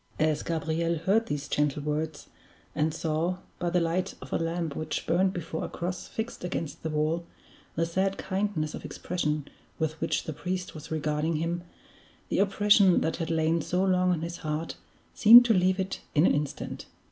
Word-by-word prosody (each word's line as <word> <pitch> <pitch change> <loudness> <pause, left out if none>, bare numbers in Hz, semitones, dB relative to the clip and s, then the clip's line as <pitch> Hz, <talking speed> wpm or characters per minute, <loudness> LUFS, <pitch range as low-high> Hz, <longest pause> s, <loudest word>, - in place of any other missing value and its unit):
As 155 -1 +1
Gabriel 165 +1 -1
heard 210 +8 +2
these 145 0 -3
gentle 150 0 0
words, 150 0 -3 0.5
and 155 +1 +1
saw, 160 +3 -1 0.2
by 175 - 0
the 180 +1 +2
light 175 +3 -1
of - - -9
a - - +1
lamp 165 -2 -2
which 155 0 -3
burned 185 +3 +2
before 165 -3 -4
a - - -4
cross 180 +1 -4
fixed 220 -3 -5
against 165 -3 -4
the 160 - -3
wall, 155 +3 0 0.5
the 165 - +1
sad 190 +3 0
kindness 190 -6 -2
of - - -7
expression 150 -5 -2 0.3
with 160 -1 -2
which - - 0
the 160 - -5
priest 180 +4 -4
was 155 0 -9
regarding 155 +1 -1
him, 165 +2 -1 0.7
the - - 0
oppression 200 -1 +5
that 160 - -1
had 165 -2 -3
lain 160 0 +2
so 180 +5 0
long 185 -1 +3
on 170 -3 0
his 170 +1 -4
heart 155 +2 -3 0.4
seemed 235 +3 +9
to 230 - +4
leave 185 0 +2
it 190 0 -3
in 150 +3 +5
an - - +4
instant. 145 -1 -3
165 Hz, 180 wpm, -28 LUFS, 155-185 Hz, 0.7 s, seemed